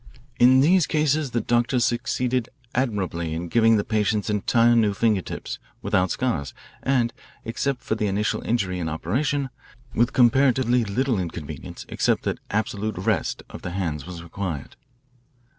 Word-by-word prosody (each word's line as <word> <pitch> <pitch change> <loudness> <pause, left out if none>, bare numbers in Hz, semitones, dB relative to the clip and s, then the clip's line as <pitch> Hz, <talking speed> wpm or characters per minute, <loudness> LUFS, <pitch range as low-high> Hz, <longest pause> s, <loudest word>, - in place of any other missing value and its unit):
In 130 +2 +7
these 175 +3 +4
cases 150 -2 +1
the 120 -1 -1
doctors 120 +1 +2
succeeded 125 0 0 0.2
admirably 95 -10 -1
in 85 +1 -4
giving 115 +2 +4
the 100 - +1
patients 105 -1 0
entire 115 +3 +3
new 105 -3 +3
fingertips, 100 - -1 0.2
without 95 -2 +2
scars, 80 - -2 0.3
and, 125 -3 +1 0.3
except 125 +3 -2
for - - -1
the 110 -1 0
initial 100 +2 0
injury 95 -6 -1
and 80 -2 -2
operation, 130 - -1 0.4
with 120 +1 +2
comparatively 125 -1 +4
little 115 +2 0
inconvenience 85 -4 -6
except - - +1
that - - -2
absolute 110 -1 -2
rest 110 +4 -1
of - - -10
the 85 - -5
hands 80 -5 -3
was 85 -2 -7
required.. 85 -4 -5
110 Hz, 140 wpm, -24 LUFS, 95-125 Hz, 0.4 s, In